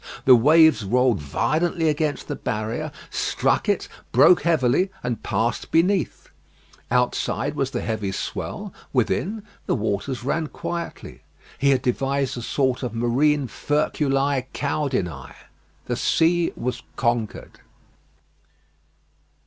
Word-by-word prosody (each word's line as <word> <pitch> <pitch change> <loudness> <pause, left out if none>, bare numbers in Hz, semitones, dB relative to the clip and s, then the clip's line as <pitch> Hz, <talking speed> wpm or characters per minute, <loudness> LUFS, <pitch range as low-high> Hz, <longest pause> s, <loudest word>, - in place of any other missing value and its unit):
The 130 - +9
waves 155 +2 +5
rolled 125 +2 +2
violently 160 - 0
against 150 -1 -1
the 145 - -3
barrier, 115 +9 -3 0.2
struck - - 0
it, - - 0 0.2
broke 180 - +6
heavily 165 +2 +2
and 125 -2 -2
passed 110 +3 -1
beneath. 180 -1 +1 0.6
Outside 125 0 0
was - - -1
the - - -3
heavy 110 -3 -2
swell; - - -5 0.2
within, 210 +3 0 0.2
the - - +2
waters 110 +3 -2
ran 155 +4 -1
quietly. 170 +3 -6 0.4
He 140 - +3
had 130 -2 +2
devised 135 +1 0
a 120 - -5
sort 130 +1 0
of 125 -3 -4
marine 135 +5 +2
Furculæ 140 -2 0
caudinæ. 130 - -2 0.5
The - - -2
sea 170 +1 +2
was 125 +1 -3
conquered. 115 -3 -2
135 Hz, 115 wpm, -23 LUFS, 120-155 Hz, 0.6 s, The